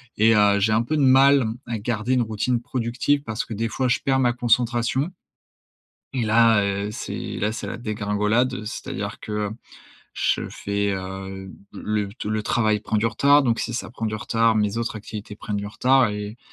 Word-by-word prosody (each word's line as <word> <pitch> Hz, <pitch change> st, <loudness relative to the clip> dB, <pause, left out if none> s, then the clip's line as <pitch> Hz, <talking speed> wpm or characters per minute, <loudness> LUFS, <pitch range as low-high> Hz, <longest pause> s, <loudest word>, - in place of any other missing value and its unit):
et 110 Hz, +1 st, +4 dB
heu, 100 Hz, -1 st, +4 dB
j'ai 105 Hz, +2 st, +2 dB
un 110 Hz, +2 st, +3 dB
peu 155 Hz, +6 st, -2 dB
de 150 Hz, -, +1 dB
mal, 135 Hz, +1 st, +6 dB
m 110 Hz, -1 st, -1 dB
à 115 Hz, -2 st, -3 dB
garder 115 Hz, +2 st, -1 dB
une 125 Hz, -, +3 dB
routine 115 Hz, +2 st, -1 dB
productive, 125 Hz, +3 st, -1 dB
parce 115 Hz, -1 st, -3 dB
que 115 Hz, -, -7 dB
des 115 Hz, +2 st, -1 dB
fois 130 Hz, +3 st, -1 dB
je 125 Hz, -, +2 dB
perds 135 Hz, -1 st, +1 dB
ma 125 Hz, -2 st, +3 dB
concentration. 120 Hz, +4 st, +1 dB, 1.1 s
Et 130 Hz, -, 0 dB
là, 110 Hz, -1 st, +4 dB
heu, 100 Hz, +1 st, -1 dB
c'est, 105 Hz, -, -5 dB
là, 105 Hz, +2 st, 0 dB
c'est 115 Hz, -, -5 dB
la -, -, -5 dB
dégringolade, 110 Hz, +2 st, 0 dB
heu, 110 Hz, -, -6 dB
c'est-à-dire 105 Hz, -, -5 dB
que, 105 Hz, -1 st, -3 dB, 0.7 s
je -, -, 0 dB
fais 100 Hz, 0 st, -2 dB
heu, 95 Hz, 0 st, -6 dB, 0.2 s
le 105 Hz, -1 st, -2 dB
t 105 Hz, +1 st, -6 dB
le 110 Hz, 0 st, -1 dB
travail 110 Hz, -1 st, +1 dB
prend 110 Hz, -, -1 dB
du 105 Hz, -, +1 dB
retard, 140 Hz, +6 st, +4 dB
donc 120 Hz, -3 st, +1 dB
si 120 Hz, -, -3 dB
ça 120 Hz, -, -4 dB
prend 115 Hz, -1 st, -5 dB
du 110 Hz, -, -2 dB
retard, 115 Hz, +1 st, +1 dB
mes 105 Hz, 0 st, +1 dB
autres 115 Hz, -1 st, -2 dB
activités 105 Hz, -1 st, -8 dB
prennent 105 Hz, 0 st, -5 dB
du 100 Hz, -, -4 dB
retard 125 Hz, +4 st, +3 dB
et 105 Hz, +2 st, -5 dB
110 Hz, 200 wpm, -23 LUFS, 105-120 Hz, 1.1 s, mal